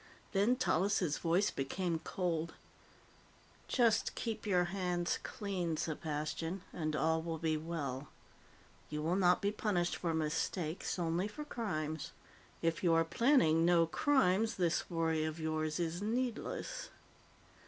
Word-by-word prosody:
Then 205 +5 +3
Tallis' 195 - +1
voice 175 +4 +2
became 165 +5 -2
cold. 165 -2 -2 1.1
"Just 230 -4 +2
keep 225 -2 -3
your 180 -3 +4
hands 180 -3 0
clean, 185 -5 -2
Sepastian, 160 +3 -3
and 155 -2 -2
all 160 +1 +2
will 165 0 -3
be 160 -1 0
well. 150 -4 -4 0.8
You 150 0 -3
will 170 +3 +1
not 180 -1 +4
be 200 - +2
punished 195 -5 0
for 165 -2 -1
mistakes 160 +3 -1
only 175 +2 0
for 295 +8 -7
crimes. 160 - -3 0.5
If 165 +1 0
you 170 -2 +4
are 165 0 +4
planning 165 - +4
no 170 -1 +5
crimes, 225 - +2
this 175 -3 0
worry 165 -2 +1
of 155 +1 -3
yours 155 0 -1
is 170 +1 -1
needless." 235 +2 -2
170 Hz, 130 wpm, -35 LUFS, 160-195 Hz, 1.1 s, no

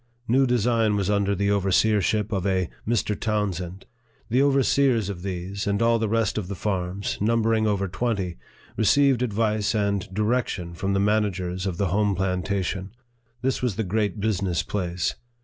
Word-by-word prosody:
New 130 +3 +3
Design 115 -3 +2
was 100 0 0
under 100 -1 +1
the 100 +2 +1
overseer 100 +2 +3
ship 105 +2 0
of 95 -4 -1
a 95 -3 0 0.2
Mr. 110 -2 +1
Townsend. 95 -4 -2 0.5
The 125 +3 +4
overseers 135 -5 +3
of 90 -3 -5
these, 95 +1 -4
and 100 0 +1
all 115 0 +3
the 110 -1 0
rest 110 -1 +1
of 95 - -5
the 100 - -4
farms, 95 0 -2
numbering 110 0 +2
over 100 -2 0
twenty, 95 - -2 0.4
re - - +1
ceived 140 +1 +4
advice 110 -2 0
and 100 -3 -1
direction 105 -4 -1
from 95 +4 -2
the 100 - +2
managers 100 -3 0
of 90 -3 -3
the 100 -1 0
home 100 +2 +1
plantation. 95 +1 -2 0.5
This 130 0 0
was 125 -6 0
the 110 - -1
great 105 +2 -1
business 100 -4 0
place. 90 -3 -2
100 Hz, 165 wpm, -25 LUFS, 95-110 Hz, 0.5 s, The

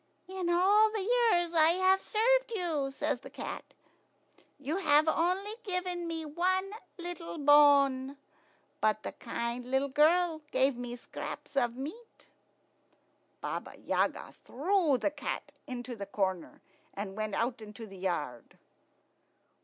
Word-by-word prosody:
"In 375 -2 -3
all 400 +5 +5
the 430 0 -3
years 440 -7 +2
I 320 0 +5
have 380 +1 +4
served - - +2
you," 315 -8 -1
says 285 -1 -2
the - - -11
cat, - - -6 1.0
"you 290 +5 -2
have 305 -5 +4
only 365 +6 +1
given 360 -3 -2
me 325 -1 -4
one 370 +5 0 0.3
little 345 -1 -6
bone; 280 -2 +5 0.6
but 215 0 +1
the - - -4
kind 235 +1 -4
little 265 +2 +1
girl 320 +3 +3
gave 265 0 +2
me 245 0 -5
scraps 245 +3 -8
of 240 -3 +1
meat." 325 - -9 1.2
Baba - - -5
Yaga - - -1
threw 320 0 +1
the 300 - 0
cat - - -5 0.2
into 250 -1 -6
a 200 - -4
corner, 190 -3 -3 0.3
and 195 -1 -5
went 215 -1 -3
out 235 0 -1
into 215 +1 -9
the 195 -2 -12
yard. 150 -10 -4
300 Hz, 130 wpm, -31 LUFS, 245-360 Hz, 1.2 s, all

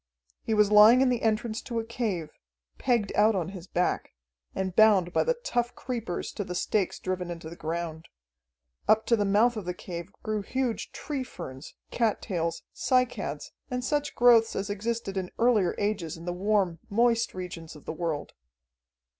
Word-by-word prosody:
He 220 - -1
was 210 -1 +4
lying 215 +4 +8
in 265 - +4
the 245 -2 0
entrance 220 0 0
to 235 - -5
a 225 - 0
cave, 215 -9 -3 0.5
pegged 235 -6 +1
out 215 +1 +4
on 180 -2 -1
his 185 -2 -9
back, 180 0 -1 0.4
and 190 -1 -2
bound 200 -5 +5
by - - +3
the - - +1
tough 245 - -2
creepers 235 -8 -4
to 205 - -4
the 180 -1 -6
stakes 195 +1 0
driven 185 -1 -3
into 165 -2 -7
the - - -8
ground. 165 0 -4 0.8
Up 220 0 +4
to 235 - +4
the 205 -2 0
mouth 220 +4 +3
of 210 - -5
the 180 0 -3
cave 175 +1 -7
grew 215 -1 -1
huge 250 +2 -2
tree 285 -4 -4
ferns, 135 - -9 0.2
cattails, 175 -7 -1
cycads, 255 -1 0 0.2
and 250 -1 -2
such 290 -1 -1
growths 235 -2 +5
as 200 +1 -2
existed 210 -1 -3
in 185 -1 -2
earlier 225 -7 +3
ages 200 -6 -2
in 165 - -10
the 175 - -2
warm, 190 -3 +1
moist 230 +1 +2
regions 170 -3 -7
of 150 - -14
the - - -4
world. 160 -3 -3
205 Hz, 175 wpm, -28 LUFS, 180-235 Hz, 0.8 s, lying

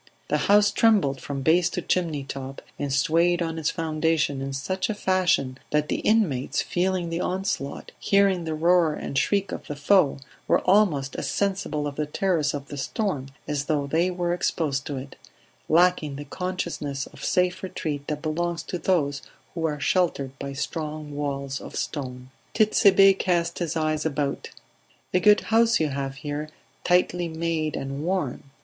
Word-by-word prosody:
The - - +2
house 205 0 +6
trembled 195 -14 +3
from 140 -2 -4
base 170 +4 +4
to 180 - -3
chimneytop, 140 -6 -3 0.2
and 145 -1 -2
swayed 165 +5 +3
on 165 -1 -3
its 155 - 0
foundation 160 -3 0
in 135 0 -3
such 185 +10 -2
a 215 - -1
fashion 185 -9 +1
that 150 0 0
the - - 0
inmates, 180 - +1
feeling 180 -1 -1
the 165 +1 -1
onslaught, 185 -6 -3
hearing 195 -3 +3
the 160 -1 -3
roar 165 -1 +3
and - - -6
shriek 195 +7 +1
of - - -6
the 145 - -4
foe, 150 +1 +3 0.3
were - - +3
almost 175 -9 +2
as - - -2
sensible 190 -7 -1
of 145 -1 -5
the 150 -1 -1
terrors 155 -3 0
of 140 -1 -7
the 145 - -6
storm 145 -2 -2 0.2
as 145 -2 -2
though 145 -3 0
they 165 +6 +1
were 175 -1 -1
exposed 150 -5 -1
to 145 - -3
it; 135 +1 -8 0.5
lacking 165 -3 +3
the 145 +1 -7
consciousness 145 -4 -3
of - - -13
safe 180 0 +1
retreat 150 -6 -4
that 150 0 -3
belongs 170 +1 -1
to 180 - -5
those 145 -6 +1 0.3
who 165 -2 -2
are 150 -1 -3
sheltered 145 -4 +1
by 140 - -5
strong 150 +1 -4
walls 140 -1 -3
of - - -9
stone. 130 -3 -5 0.2
Tit'Sebe 195 -3 +5
cast 170 -2 0
his 170 -2 -2
eyes 155 -1 0
about. 145 -2 -2 0.6
"A 180 - +4
good 210 +2 +5
house 230 +1 +3
you 155 -2 +1
have 135 0 -3
here; 150 +1 -5 0.3
tightly 180 -1 +2
made 160 -2 -2
and 135 +2 -4
warm. 165 -7 -2
160 Hz, 170 wpm, -25 LUFS, 140-180 Hz, 0.6 s, house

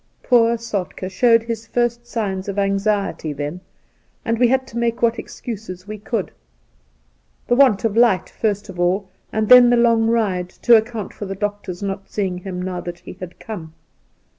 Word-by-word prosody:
Poor 235 -2 +4
Soltk^ 200 -4 -4
showed 230 +3 +4
his 230 -1 -5
first 240 0 -1
signs 195 -5 -3
of 200 - -4
anxiety 200 -5 0
then, 145 +5 -5 0.6
and 230 0 0
we 245 - +5
had 260 +2 +1
to 235 - -9
make 235 0 -1
what 235 0 +2
excuses 200 -5 -7
we 215 0 -6
could 210 -1 -3 0.6
— - - -41
the 245 - +3
want 255 -7 +4
of 220 -2 0
light, 230 -5 +4
first 205 -2 -2
of 180 -2 -9
all, 185 +3 +1 0.2
and 220 0 0
then 250 0 +9
the 245 - +4
long 230 -1 +4
ride 200 -6 0
— - - -37
to 240 - +7
account 220 -1 -1
for 205 - -7
the 195 - -4
doctor's 205 -2 -4
not 195 0 -4
seeing 190 -4 -2
him 180 -1 -6
now 180 -1 -3
that 175 0 -6
he 175 - -11
had 180 -1 -9
come. 165 -8 -8
205 Hz, 190 wpm, -20 LUFS, 185-230 Hz, 0.6 s, then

